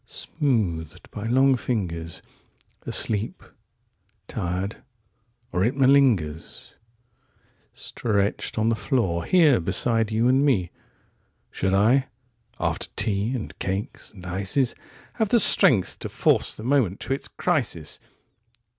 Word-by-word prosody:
76Smoothed 85 - -2
by 105 +1 -5
long 130 +3 +4
fingers,77Asleep... 100 +1 -4 0.8
tired... 90 +4 -3 0.7
or 90 - 0
it 120 +6 +1
malingers,78Stretched 115 - -2
on 110 +1 +2
the 115 - +2
floor, 95 - -1
here 160 - +4
beside 110 +6 0
you 110 +2 +2
and 130 +2 +3
me.79Should 95 -4 -4
I, 125 +7 +3 0.5
after - - -2
tea 105 +4 -1
and 120 - -6
cakes 95 +2 -4
and 95 -3 -14
ices,80Have 115 - -3
the 235 - +4
strength 115 - +4
to - - -6
force - - +1
the 110 - -10
moment 120 -7 +1
to 135 - -2
its 135 - -5
crisis? 120 - -2
110 Hz, 100 wpm, -24 LUFS, 95-130 Hz, 0.8 s, long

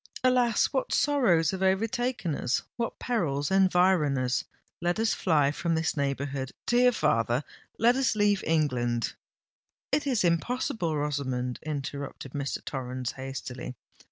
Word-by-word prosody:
Alas! 250 -3 +3
what 265 - -1
sorrows 225 - +3
have 190 -1 -5
overtaken 220 - 0
us—what 185 - -2
perils 155 - -1
environ 185 -6 +3
us! 125 -1 0 0.4
Let 175 0 0
us 225 0 +2
fly 150 -6 +2
from 165 +2 -1
this 160 0 0
neighbourhood, 140 -2 -2
dear 245 +1 +4
father—let 145 - 0
us 265 -4 +1
leave 205 -2 +2
England——" 125 -7 +1 0.8
"It 290 - +1
is 250 -7 +2
impossible, 175 -1 0
Rosamond!" 130 -4 -2
interrupted 140 -2 -5
Mr. 140 -2 -3
Torrens 130 -2 -4
hastily. 130 -1 -6
160 Hz, 120 wpm, -28 LUFS, 135-220 Hz, 0.8 s, dear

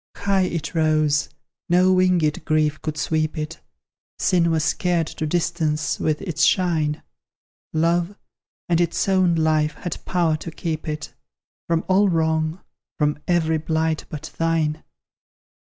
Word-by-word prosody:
High 195 -2 +1
it 165 0 -4
rose 155 -3 +2 0.4
no 180 +2 +4
winged 180 -5 +2
grief 155 -1 +1
could 155 -1 -4
sweep 155 +1 -1
it; 155 +1 -5 0.6
Sin 175 -3 +2
was 160 -1 +1
scared 175 0 +1
to 155 0 -4
distance 160 -2 -1
with 155 -1 -1
its 160 -5 -1
shine; 160 -5 +2 0.7
Love, 170 +4 +1 0.5
and 170 -1 +2
its 170 +2 0
own 185 -3 +3
life, 155 -1 +1
had 175 - -6
power 170 -4 +1
to 165 - -7
keep 160 -1 -4
it 155 0 -5 0.5
From 165 0 0
all 195 +2 +4
wrong 160 0 0 0.4
from 150 -1 0
every 160 -2 +2
blight 160 0 -1
but 155 0 -7
thine! 160 -2 0
160 Hz, 135 wpm, -22 LUFS, 155-175 Hz, 0.7 s, no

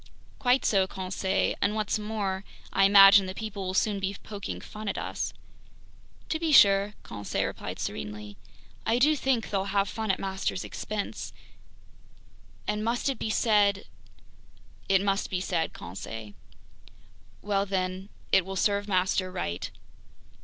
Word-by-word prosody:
"Quite 255 0 +3
so, 195 -3 +3
Conseil, 190 0 -1
and 205 +1 +1
what's 215 0 0
more, 205 -3 -2 0.3
I 195 - +5
imagine 195 0 +8
that 185 - -6
people 200 -3 -5
will 185 - -3
soon 205 +1 +1
be 195 +1 -3
poking 205 -2 -6
fun 215 0 -9
at - - -3
us!" - - -3 1.0
"To 315 - -1
be 325 -1 0
sure," 200 -5 +6
Conseil 100 -2 -3
replied - - -5
serenely, 105 +5 -5 0.5
"I 230 - +2
do 300 +5 +4
think 265 -5 0
they'll 195 -1 0
have 200 0 +1
fun 220 0 -4
at 190 - +2
master's 190 -1 -2
expense. 210 -1 -5 1.3
And 210 0 -1
must 235 +4 0
it 265 - -3
be - - -2
said... 205 -3 +3 0.6
?" - - -28
"It 195 0 +4
must 195 0 0
be 185 - -1
said, 180 -3 -1
Conseil." 105 +4 -8 1.1
"Well 200 -1 0
then, 185 0 -2 0.2
it 195 - +5
will 195 +2 -6
serve 205 +1 +1
master 185 -1 +1
right!" 85 - -3
195 Hz, 145 wpm, -28 LUFS, 190-210 Hz, 1.3 s, imagine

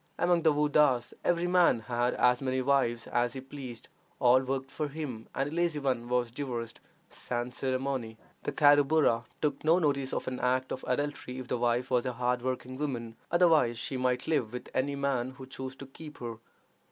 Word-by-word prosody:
Among 175 -1 +3
the 160 -1 +4
Woddas 145 -4 +3
every 175 0 +2
man 175 -9 +4
had 120 +1 0
as 125 +1 +3
many 130 -1 0
wives 130 -3 +1
as 120 -1 0
he 135 - -5
pleased; 130 -4 -9 0.3
all 125 +1 +5
worked 135 0 -3
for 150 - -2
him, 140 -7 -6
and 135 - 0
a - - -8
lazy 170 -2 +1
one 130 -4 -1
was 125 -1 +1
divorced 120 -4 -5 0.3
sans 120 0 -4
ceremonie. 130 -3 -2 0.2
The - - -3
Carruburru 145 -4 +4 0.2
took 145 -2 0
no 160 +3 +5
notice 140 -5 0
of - - -3
an 130 -1 -3
act 130 +1 0
of 130 - -4
adultery 140 -1 -2
if 130 -1 -7
the - - 0
wife 120 +2 +1
was 125 0 +2
a 125 - -2
hard 125 0 0
working 130 0 -3
woman; 120 -6 -3
otherwise 165 -9 +4
she 135 - -4
might 125 -1 0
live 135 -8 0
with 125 - -6
any 140 +2 0
man 135 -2 -1
who 130 0 -10
chose 130 0 -7
to 140 - -9
keep 150 +2 -11
her. 115 -2 -6
130 Hz, 190 wpm, -30 LUFS, 125-145 Hz, 0.3 s, all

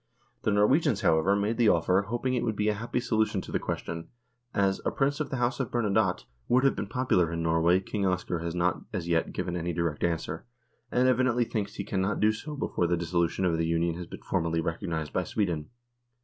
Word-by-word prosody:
The 110 - +1
Norwegians, 110 - +3
however, 95 +1 +3
made 105 +3 0
the 115 -3 +5
offer, 90 +2 +3
hoping 120 +5 -2
it 125 - 0
would 110 -2 -1
be 105 +1 +1
a - - +2
happy 115 +4 -2
solution 110 -3 +1
of - - -9
the - - 0
question, 85 0 -4 0.4
as 95 -1 +1
" - - -28
a - - +3
Prince 140 +1 0
of 155 - -2
the - - -2
House 120 +2 0
of 130 - -1
Bernadotte 105 - +1
" - - -40
would 130 +2 +4
have 135 - +3
been 105 - -3
popular 110 -8 +1
in 85 0 -2
Norway 80 +2 +3
King 100 0 -1
Oscar 90 -2 -1
has 85 0 -4
not 90 0 +1
as 85 -2 -3
yet 85 -1 +1
given 90 - -3
any 85 0 -2
direct 85 -2 -2
answer, 85 -1 -1 0.5
and 125 +1 +3
evidently 125 -1 +3
thinks 105 -3 -3
he - - -3
cannot 95 0 -1
do 105 +1 +4
so 150 +8 -6
before 90 -10 -1
the 85 +1 +1
dissolution 85 +2 0
of 85 -2 +1
the 80 - +1
Union 85 0 +1
has 85 +1 -7
been - - -10
formally 80 0 0
recognised 80 -2 -3
by - - +1
Sweden. 85 -8 -2
95 Hz, 225 wpm, -28 LUFS, 85-115 Hz, 0.5 s, the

